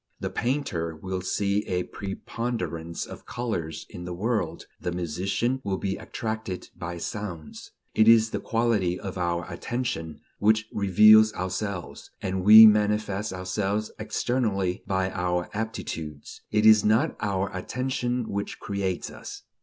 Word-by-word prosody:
The - - -3
painter 110 - -1
will 95 +3 -4
see 100 +2 0
a 90 -1 0
preponderance 100 -5 -4
of - - -11
colors 90 -10 -4
in 90 - -9
the 90 0 -5
world, 110 +4 -2
the 90 - -3
musician 95 - -1
will 95 -2 -1
be 95 0 -2
attracted 110 -4 -5
by 85 +1 -5
sounds. 90 -3 -6 0.2
It 110 - +4
is 110 -1 +6
the - - -2
quality 110 -6 0
of 95 - -6
our 85 -1 -1
attention 90 -3 -4 0.2
which 110 +1 +3
reveals 110 +2 +6
ourselves, 95 0 -4
and 95 -1 -2
we 110 +3 +11
manifest 105 -1 +2
ourselves 95 +3 -2
externally 110 -4 -1
by 95 -1 0
our 90 -2 -1
aptitudes; 85 -9 -5
it 105 0 +2
is 110 -1 +8
not 115 +9 +2
our 100 -2 -1
attention 125 +3 -2
which 100 0 -4
creates 100 -3 -3
us. - - -9
100 Hz, 135 wpm, -26 LUFS, 90-110 Hz, 0.2 s, we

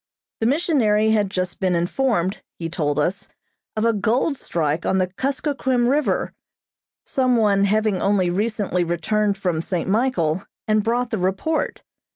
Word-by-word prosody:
The 225 - +1
missionary 235 -8 +2
had 210 -3 +2
just 185 -2 -3
been 185 -2 +1
informed, 185 +1 0 0.2
he 165 -1 -4
told 145 -4 -1
us, 175 +6 -1 0.5
of 215 +1 0
a 230 - +3
gold 235 +8 +1
strike 160 - -2
on 190 - +1
the 185 - +3
Kuskokquim 260 - -1
River, 285 +3 +1 0.7
some 255 -2 +2
one 200 -3 +3
having 215 -1 +1
only 195 -3 +2
recently 205 -2 0
returned 200 +4 0
from 180 -5 -1
St. 175 0 -2
Michael, 190 -7 +1 0.2
and 215 -1 +2
brought 240 +2 0
the 220 - -1
report. 190 - -1
210 Hz, 150 wpm, -22 LUFS, 180-240 Hz, 0.7 s, a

